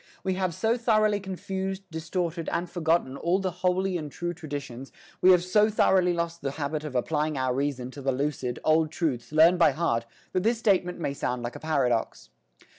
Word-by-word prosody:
We 190 - 0
have 185 -3 -1
so 225 +6 +1
thoroughly 215 -3 +2
confused, 190 0 -4
distorted 165 +1 -3
and 175 - -1
forgotten 165 -5 0
all 170 +5 +1
the 190 -1 -2
holy 185 0 +1
and 150 -2 -7
true 175 +3 -3
traditions, 140 -6 -7 0.3
we 185 - +6
have 180 -2 +6
so 210 +4 +3
thoroughly 190 -4 +3
lost 170 -1 -3
the 135 -1 -3
habit 150 +1 -2
of 150 -4 -6
applying 150 +3 0
our 130 -1 0
reason 130 -2 -2
to 140 - -9
the 135 0 0
lucid, 130 -2 -2
old 155 0 +3
truths 145 -8 -2
learned 165 +3 +5
by 170 - +5
heart, 115 -9 0 0.3
that 185 - +1
this 225 +4 +2
statement 185 -5 +1
may 140 -4 -2
sound 125 -3 -3
like 120 0 -5
a - - -7
paradox. 130 -7 -1
165 Hz, 190 wpm, -27 LUFS, 140-185 Hz, 0.3 s, we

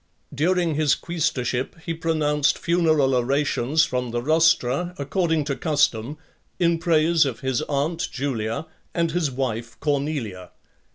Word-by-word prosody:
VI. - - -10
During 180 -2 +2
his 150 -1 +2
quaestorship 140 -7 -2
he 165 - -2
pronounced 155 -3 +1
funeral 160 -6 +2
orations 140 +3 +1
from 125 -1 -2
the 120 +1 -2
rostra, 160 +3 +2
according 160 +2 0
to 140 -1 -2
custom, 145 -4 0 0.4
in 170 -1 +2
praise 165 0 +3
of 130 -6 -3
his 130 -3 0
aunt 150 +4 -1
(5) 180 - -3
Julia, 125 -1 -3 0.3
and 170 -2 +1
his 165 -3 0
wife 120 -3 -4
Cornelia. 140 - -2
150 Hz, 135 wpm, -23 LUFS, 130-165 Hz, 0.4 s, praise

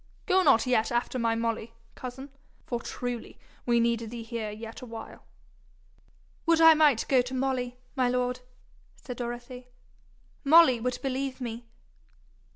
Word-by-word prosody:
Go 375 -1 +4
not 275 -9 +4
yet 245 -3 +1
after 240 +1 -1
my 230 -1 +1
Molly, 230 0 -3 0.2
cousin, 265 +2 -8 0.3
for 240 -1 -3
truly 245 -1 -5 0.3
we 235 -1 +4
need 235 0 +2
thee 235 0 -7
here 225 -1 -4
yet 220 +2 -8
a - - -7
while.' 225 -1 -10 1.2
'Would 330 -1 +4
I 325 0 +9
might 300 -7 +4
go 260 -2 +4
to 250 +1 -6
Molly, 255 -2 -1 0.2
my 255 -2 +2
lord!' 250 0 -1 0.6
said 250 -3 -9
Dorothy. 245 +1 -6 0.8
'Molly 300 -4 +6
would 250 +2 -2
believe 270 0 -2
me.' 235 -1 -6
245 Hz, 145 wpm, -28 LUFS, 235-265 Hz, 1.2 s, I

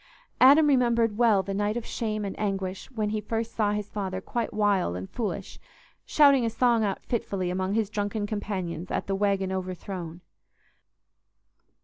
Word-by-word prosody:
Adam 285 +4 +7
remembered 235 -6 +3
well 220 -5 +4
the 195 +1 -4
night 205 +3 0
of 240 - -5
shame 215 -2 -3
and 195 - -3
anguish 195 -2 -3
when 215 -5 -2
he 215 0 -1
first 225 +2 -3
saw 210 -2 +1
his 210 -1 -3
father 190 -3 -3
quite 235 +5 -3
wild 200 - +1
and 90 +1 -7
foolish, 230 -4 -4 0.5
shouting 280 -4 +5
a 230 - +1
song 230 0 +2
out 195 -2 -2
fitfully 195 -6 -2
among 190 +2 -1
his 220 -2 +1
drunken 205 0 -2
companions 190 -5 -4
at - - -2
the 195 - -2
"Waggon 195 -1 0
Overthrown." 185 -2 -5
205 Hz, 160 wpm, -27 LUFS, 190-225 Hz, 0.5 s, Adam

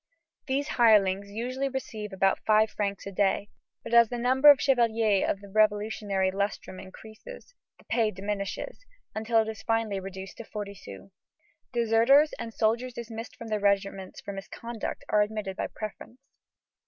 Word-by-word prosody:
These 280 +2 0
hirelings 200 -4 +4
usually 255 +6 -3
receive 220 -5 -5
about 190 0 +1
five 215 0 +3
francs 200 -2 -3
a 200 - -5
day, 200 +1 0 0.3
but - - -7
as 235 -1 +7
the 245 - -3
number 260 +4 +5
of 290 - +9
the - - -4
chevaliers 230 -6 +2
of 200 - -2
the 200 - -11
revolutionary 205 -2 +1
lustrum 195 -1 -3
increases, 220 - -12 0.2
the - - -22
pay 225 -3 +1
diminishes, 200 - -4 0.3
until 220 +1 +2
it - - -9
is 220 -2 -6
finally 225 -3 0
reduced 190 0 -8
to - - -7
forty 205 -2 -6
sous. 100 - -12 0.6
Deserters 235 +6 +4
and 235 -1 -5
soldiers 235 +3 0
dismissed 230 0 -7
from 230 - -9
their 215 -1 0
regiments 195 -1 -1
for - - -6
misconduct 225 +3 -6
are 210 - +3
admitted 210 -2 -2
by - - -2
preference. 215 +3 -8
215 Hz, 160 wpm, -28 LUFS, 200-235 Hz, 0.6 s, of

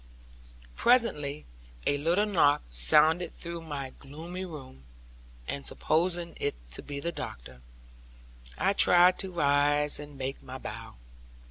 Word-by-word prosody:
Presently 150 - +2 0.4
a 145 - +2
little 170 +7 +2
knock 165 - +3
sounded 150 - +3
through 170 -1 -6
my 145 -5 -5
gloomy 165 +7 -8
room, 135 - -10 0.6
and 140 - -4
supposing 170 +1 0
it 145 - -1 0.2
to 60 - -6
be 145 -1 -6
the 170 +4 -2
doctor, 60 - -8 1.0
I 195 +2 +2
tried 180 -1 +5
to 190 - +1
rise 145 -2 +3
and 145 -1 -10
make 135 +1 -4
my 130 0 -8
bow. 125 - -8
150 Hz, 125 wpm, -29 LUFS, 140-175 Hz, 1.0 s, tried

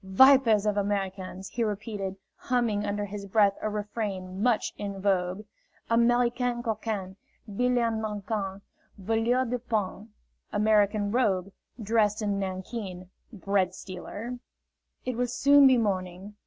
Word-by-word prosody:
"Vipers 225 +1 +5
of 210 -1 +1
Americans!" 195 -2 -2
he 235 - -2
repeated, 205 -2 -3 0.2
humming 235 -5 0
under 205 0 -1
his 200 0 -7
breath 200 0 +4
a 215 - -1
refrain 205 -3 -4
much 240 -1 +1
in 200 -1 -5
vogue: 190 +1 0 0.5
"Americam 240 +1 +2
coquin, 215 -4 -3 0.3
'Bille 245 +4 +1
en 230 -2 +1
nanquin, 205 -2 -3 0.4
Voleur 225 +5 +1
du 250 +1 -2
pain." 215 -2 -3 0.4
("American 210 -1 +2
rogue, 200 -6 +1 0.3
dressed 215 -1 +1
in 200 -1 0
nankeen, 185 -1 -5 0.2
bread 195 -3 0
stealer.") 205 +6 -7 0.7
"It 255 -2 -2
will 245 0 +1
soon 280 +3 +6
be 260 -1 +5
morning." 190 -2 -2
210 Hz, 125 wpm, -28 LUFS, 195-230 Hz, 0.7 s, soon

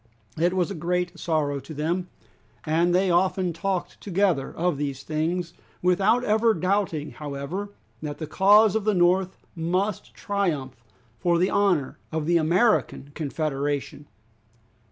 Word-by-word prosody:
It 175 +3 +2
was 180 -3 0
a - - -2
great 175 +1 -2
sorrow 150 -4 0
to 155 +3 -10
them, 170 +5 -1 0.6
and 165 +3 +2
they 185 0 +3
often 180 0 +1
talked 190 +1 -3
together 185 -8 0
of 175 -3 -1
these 140 -2 -4
things, 165 +2 -2 0.3
without 195 +7 +3
ever 220 0 +3
doubting 180 -4 -1
however 150 +7 -5 0.3
that 150 -2 -5
the 160 - -5
cause 205 +5 +5
of 220 - 0
the 215 -1 +1
North 180 +1 +2 0.2
must 180 +5 -2
triumph, 150 -12 -2 0.4
for 170 +6 +2
the 180 +2 +2
honor 180 -10 +1
of 160 -1 -2
the 170 +1 +3
American 170 - +1
Confederation. 145 -1 -3
175 Hz, 135 wpm, -25 LUFS, 155-190 Hz, 0.6 s, cause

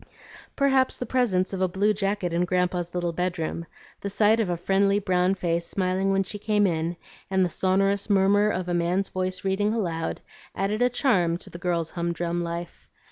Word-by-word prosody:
Perhaps 270 -2 +2
the 250 - -4
presence 210 -7 +1
of 190 - -3
a 185 - +3
blue 200 +4 +1
jacket 195 -3 -1
in 170 +1 +2
Grandpa's 180 -1 -1
little 175 -1 -1
bedroom, 170 -1 -3 0.3
the 200 - -4
sight 215 +3 +3
of 215 -5 0
a 175 - -1
friendly 195 +3 +2
brown 185 -1 +1
face 170 -2 -1
smiling 190 0 0
when 195 0 +2
she 205 +2 -7
came 210 0 +2
in, 170 -1 -1 0.3
and 190 -1 +2
the - - -1
sonorous 195 +3 +1
murmur 200 +1 +4
of 185 -3 -2
a 175 - -1
man's 175 +3 0
voice 185 0 -3
reading 205 +3 +1
aloud, 165 -7 -2 0.4
added 205 +4 -1
a 245 - +4
charm 190 - +2
to - - -13
the 170 - -9
girl's 170 -3 -1
humdrum 170 0 -2
life. 170 0 -6
185 Hz, 190 wpm, -25 LUFS, 175-200 Hz, 0.4 s, murmur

